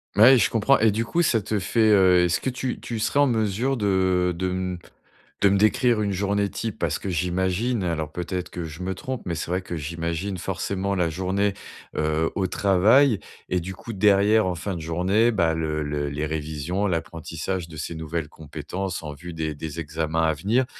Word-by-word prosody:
Ouais, 120 +4 +8
je - - +3
comprends 115 +5 +3
et 110 0 +5
du 110 +3 0
coup 170 +8 +1
ça 120 -9 +3
te 105 +1 -2
fait, 110 +3 +2
heu, 90 -3 +5
est-ce 85 -1 +1
que 130 - -1
tu 130 0 -3
tu 115 - -5
serais 140 +6 0
en 145 - +5
mesure 115 +3 0
de 95 -3 +2
de 95 +1 -1
m 90 -1 -3 0.6
de 100 - +5
me 100 0 +3
décrire 110 +2 +3
une 100 -1 0
journée 100 +1 0
type? 115 -3 -4
Parce 85 -4 -1
que 100 - -4
j'imagine- 95 +6 0
alors 80 -3 -2
peut-être 90 +1 -4
que 85 -2 -5
je 80 +3 -8
me 95 +1 -2
trompe- 130 +5 -5
mais 85 -2 -2
c'est 80 - -4
vrai 90 - 0
que 90 -2 -5
j'imagine 85 +5 -3
forcément 95 +2 -2
la 85 -2 +1
journée, 95 +4 0 0.4
heu, 80 +1 +1
au 95 - 0
travail 100 +7 +4 0.3
et 90 - 0
du 95 +3 -6
coup 115 +4 -8
derrière 105 +1 +4
en 90 - -1
fin 90 +2 -4
de 80 - -6
journée, 95 +8 +2
bah, 85 -6 +2
le 80 -1 -2
le 75 -1 -2
les 75 +2 -3
révisions, 80 +5 -2
l'apprentissage 85 +1 -3
de 80 - -10
ces 80 +2 -5
nouvelles 80 0 -3
compétences 80 +5 -6
en 75 -1 -5
vue 90 +4 -9
des 80 -1 -3
des 80 +2 -6
examens 80 +1 -1
à 80 - +3
venir. 110 - +1
90 Hz, 205 wpm, -24 LUFS, 80-105 Hz, 0.6 s, Ouais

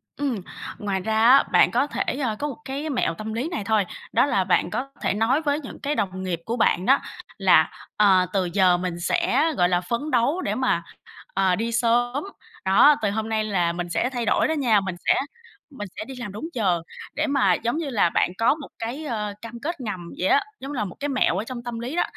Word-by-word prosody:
Ừm, 265 -8 -2 0.4
ngoài 200 -2 -2
ra 220 +3 -2
á, 245 +5 +7
bạn - - +5
có 285 - +2
thể, - - -2
ờ, 235 -7 -1
có 295 - -1
một 285 - -6
cái 280 +4 -4
mẹo 245 - 0
tâm 215 +5 -6
lý 250 +9 -2
này 320 - -3
thôi, 210 -1 +2 0.3
đó - - +4
là 195 -9 +1
bạn 180 -2 +2
có 265 +8 -3
thể - - +1
nói 225 +8 +2
với 290 -1 0
những 270 - -9
cái 295 +1 -2
đồng 185 -1 -2
nghiệp 175 -3 -2
của 235 +2 -2
bạn 190 -4 +2
đó 270 +1 +5 0.4
là: - - +5 0.3
"Ờ, 190 -3 +5
từ 190 -2 +1
giờ 185 -3 +4
mình 175 -1 -4
sẽ, 255 - +1
gọi 175 0 +3
là, 180 0 +2
phấn 235 +11 -3
đấu 260 +9 +2
để - - -2
mà, 255 -10 +1 0.5
ờ, 190 -1 +2
đi 230 +4 -2
sớm. 245 +3 +1 0.4
Đó, 285 +10 +6
từ 205 - +1
hôm 220 +1 -3
nay 220 -1 0
là 180 -5 0
mình 175 0 -4
sẽ 240 +8 0
thay 245 -3 -3
đổi - - +2
đó 315 - 0
nha, 245 -9 +3
mình 190 -2 -4
sẽ - - +5 0.6
mình 260 -9 -7
sẽ 210 - -3
đi 265 +1 -9
làm 235 -5 -6
đúng 215 +10 -6
giờ." 185 -7 +1 0.3
để 310 +1 0
mà 275 -10 +3
giống 235 - -1
như 320 -3 -3
là 210 -9 +2
bạn 175 - +1
có 230 +5 +3
một 295 -3 -9
cái, 250 +7 -4
ờ, 210 -6 -3
cam 230 +1 -8
kết 305 +1 -4
ngầm 180 -7 -5
vậy 185 - +1
á, 280 - +5 0.2
giống 275 +2 -7
như 285 - -5
là 210 - 0
một 180 - -8
cái 290 +1 -2
mẹo 255 -9 +1
ở 205 - -1
trong 240 0 -7
tâm 240 -1 -5
lý 250 +7 -5
đó, - - +3
230 Hz, 245 wpm, -24 LUFS, 195-270 Hz, 0.6 s, á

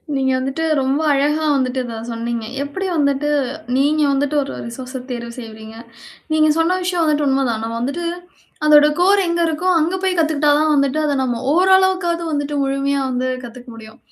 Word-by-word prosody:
நீங்க 265 -1 +1
வந்துட்டு, 270 +5 -3 0.2
ரொம்ப 270 +4 0
அழகா 295 +3 +1
வந்துட்டு 260 -1 -1
இதை 230 -1 -6 0.2
சொன்னீங்க. 230 0 -4 0.2
எப்படி 290 +7 -5
வந்துட்டு, 285 0 +1 0.5
நீங்க 300 +3 +2
வந்துட்டு 285 +2 0
ஒரு 275 - -7
ரிசோர்ஸ 255 +2 -7
தேர்வு 235 -1 -5
செய்றீங்க. 220 -1 -10 0.6
நீங்க 310 0 +4
சொன்ன 345 +3 +2
விஷயம் 355 -1 0
வந்துட்டு 300 -2 +1
உண்மைதான். 265 -5 0
நாம 225 - -4
வந்துட்டு, 285 +8 -3 0.6
அதோட 300 -1 +7
கோர் 395 +3 +4
எங்க 340 0 0
இருக்கோ, 325 +3 -2
அங்கே 335 +4 0
போய் 375 -1 +1
கத்துக்கிட்டா 305 -2 +2
தான் 310 0 +2
வந்துட்டு, 280 +1 +1
அதை 290 - 0
நம்ம 245 -2 -1 0.2
ஓரளவுக்காது 375 -1 +3
வந்துட்டு 290 0 -2
முழுமையா 275 +1 0
வந்து 255 0 -1 0.2
கத்துக்க 245 +1 -11
முடியும். 220 -1 -13
280 Hz, 165 wpm, -19 LUFS, 255-315 Hz, 0.6 s, அதோட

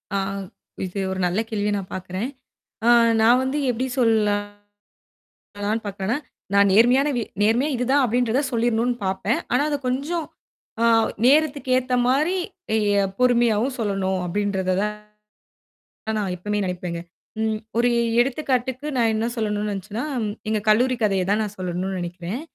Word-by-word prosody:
ஆ, - - +2 0.7
இது 185 +2 -5
ஒரு 190 - -3
நல்ல 180 +4 0
கேள்விய 210 -1 -1
நான் 190 -2 -7
பாக்குறேன். 185 +6 -4 0.6
ஆ, - - +7 0.3
நான் 240 +3 +5
வந்து 265 +3 -1
எப்படி 250 +2 -1
சொல்லலானு 205 -2 0 1.1
பாக்குறேனா, 200 +5 -2 0.4
நான் 200 -1 +5
நேர்மையான 250 +6 +5
வி 235 - 0 0.2
நேர்மையா 240 +8 +2
இதுதான் 265 +3 +2
அப்படின்றத 245 +1 +1
சொல்லிறணும்னு 235 +1 +1
பாப்பேன். 195 +4 0
ஆனா, 250 +3 +3
அத 290 - 0
கொஞ்சம் 300 +6 -2 0.6
ஆ, - - +4 0.4
நேரத்துக்கு 285 -1 +3
ஏத்த 255 0 0
மாரி 300 +8 +2 0.4
எ - - +3 0.4
பொறுமையாவும் 240 0 +2
சொல்லணும் 195 -4 -1
அப்படின்றத 190 0 -1
தான் 210 0 -1 1.2
ந - - +1
நான் 195 -3 -1
எப்பவுமே 210 +4 -2
நெனப்பேங்க. 180 -2 -4 0.4
ம். 220 -1 0 0.2
ஒரு 245 +1 +4 0.3
எடுத்துக்காட்டுக்கு, 260 0 -1
நான் 230 -2 +3
என்ன 220 +1 0
சொல்லணும்னு 210 -2 -1
நெனச்சுன்னா, 205 +5 -4 0.5
எங்க 215 -1 +1
கல்லூரி 250 +4 +4
கதைய 195 -3 +2
தான் 215 +2 +2
நான் 210 -1 -5
சொல்லணும்னு 185 +1 -3
நெனைக்கிறேன். 175 +6 -5
220 Hz, 135 wpm, -23 LUFS, 200-250 Hz, 1.2 s, ஆ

